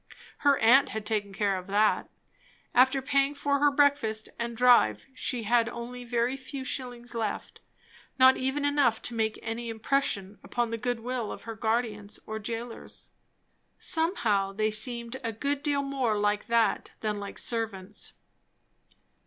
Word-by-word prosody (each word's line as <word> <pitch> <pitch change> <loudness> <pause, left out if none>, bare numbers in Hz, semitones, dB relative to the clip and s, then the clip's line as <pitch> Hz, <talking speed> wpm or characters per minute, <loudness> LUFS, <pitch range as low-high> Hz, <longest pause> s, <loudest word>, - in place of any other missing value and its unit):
Her 285 -1 +4
aunt 250 +5 +5
had 220 -1 -5
taken 210 -2 -1
care 195 0 0
of 180 - -12
that. 210 +2 +2 0.6
After 260 +2 +4
paying 275 +1 +1
for 280 0 0
her 290 +1 +5
breakfast 280 -7 +2
and 235 0 -3
drive, 240 - +4
she 250 -2 -2
had 230 +1 +2
only 240 +1 -7
a - - -9
very 240 +2 0
few 270 0 -7
shillings 245 -2 -4
left; 225 -3 -4 0.6
not 260 0 +7
even 265 +3 -1
enough 285 -6 +2
to 245 - 0
make 220 -1 -1
any 230 +1 -4
impression 220 -4 -1
upon 240 -2 -2
the 230 - -2
good 245 0 -2
will 245 -2 -3
of - - -8
her 225 - -6
guardians, 220 -2 -2
or 220 0 -5
jailers. 230 +2 -7 0.7
Somehow 220 - +1
they 215 +2 0
seemed 235 +3 +1
a 230 - -1
good 280 +6 -2
deal 285 -1 0
more 265 -6 0
like 205 0 0
that 230 -3 +1
than 210 -1 -2
like 200 0 -7
servants. 210 -4 -2
235 Hz, 155 wpm, -28 LUFS, 215-260 Hz, 0.7 s, not